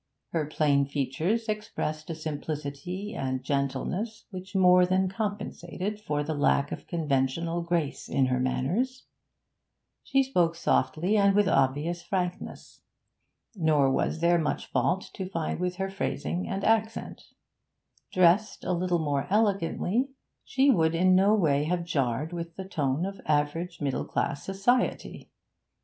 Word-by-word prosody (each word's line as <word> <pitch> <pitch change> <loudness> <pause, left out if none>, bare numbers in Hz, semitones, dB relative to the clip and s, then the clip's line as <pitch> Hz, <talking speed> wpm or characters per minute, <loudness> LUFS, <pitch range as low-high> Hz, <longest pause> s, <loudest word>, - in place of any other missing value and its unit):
Her 155 -3 -1
plain 145 -2 +2
features 150 - -1
expressed 210 -8 -3
a 165 - -3
simplicity 155 +5 -5
and 130 - -3
gentleness 180 - -2
which 185 0 -8
more 180 -1 +6
than 185 +1 +2
compensated 205 -1 -4
for 150 -7 -1
the 160 +2 -2
lack 145 -1 +2
of - - -6
conventional 165 +1 0
grace 170 -4 -2
in 135 - +2
her 130 0 0
manners; 180 - -1 1.0
she 270 0 +2
spoke 175 -11 +1
softly 170 +3 +1
and 200 -1 +4
with 205 0 +4
obvious 145 +6 +1
frankness, 180 0 -4 0.7
nor 155 -6 +3
was 160 +4 0
there 170 0 +4
much 155 - -1
fault 135 +9 0
to 190 -1 -5
find 165 -4 -2
with 180 0 -1
her 190 +1 -3
phrasing 185 -2 -2
and 195 +1 -3
accent; 220 0 0 0.9
dressed 185 +4 +3
a 185 - 0
little 175 0 +1
more 145 -4 -1
elegantly, 205 +4 +1 0.3
she 270 +2 +3
would 165 -7 +2
in 185 +2 +4
no 200 +3 +5
way 150 -7 +2
have 175 +2 0
jarred 145 0 -1
with 170 -1 -5
the 190 - -6
tone 150 -3 -1
of 195 0 -6
average 155 +3 0
middle 140 -3 -1
class 145 - -2
society. 205 +6 0
170 Hz, 140 wpm, -28 LUFS, 145-195 Hz, 1.0 s, more